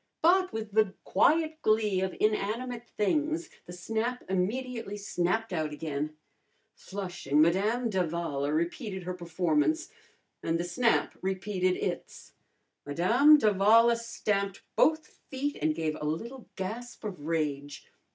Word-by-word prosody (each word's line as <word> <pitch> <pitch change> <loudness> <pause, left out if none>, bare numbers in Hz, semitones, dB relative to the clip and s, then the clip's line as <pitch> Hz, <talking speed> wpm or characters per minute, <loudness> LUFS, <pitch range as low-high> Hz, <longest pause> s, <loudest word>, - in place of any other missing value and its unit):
But 370 +3 +4
with 220 -1 -5
the 205 -2 +2
quiet 315 - +2
glee 215 -3 +2
of 190 -1 -2
inanimate 230 +3 -1
things 310 - 0 0.2
the - - -8
snap 225 +7 -3
immediately 210 +3 -2
snapped 200 +2 -1
out 155 -3 -1
again. 150 0 -4 0.6
Flushing, 175 -7 -3
Madame 205 +10 +3
d'Avala 170 -7 -1
repeated 185 - -2
her 180 +1 -4
performance, 170 - 0 0.5
and 165 0 0
the - - 0
snap 230 +7 +1
repeated 185 -1 0
its. - - -5 0.5
Madame 230 - +5
d'Avala 220 0 +5
stamped 205 -4 -2
both 315 0 +3 0.2
feet 285 +2 -2
and 155 +1 +1
gave 155 -1 -1
a - - -3
little 230 - -4
gasp 230 +6 -6
of 180 -8 -6
rage. 145 -3 -2
200 Hz, 120 wpm, -29 LUFS, 170-235 Hz, 0.6 s, Madame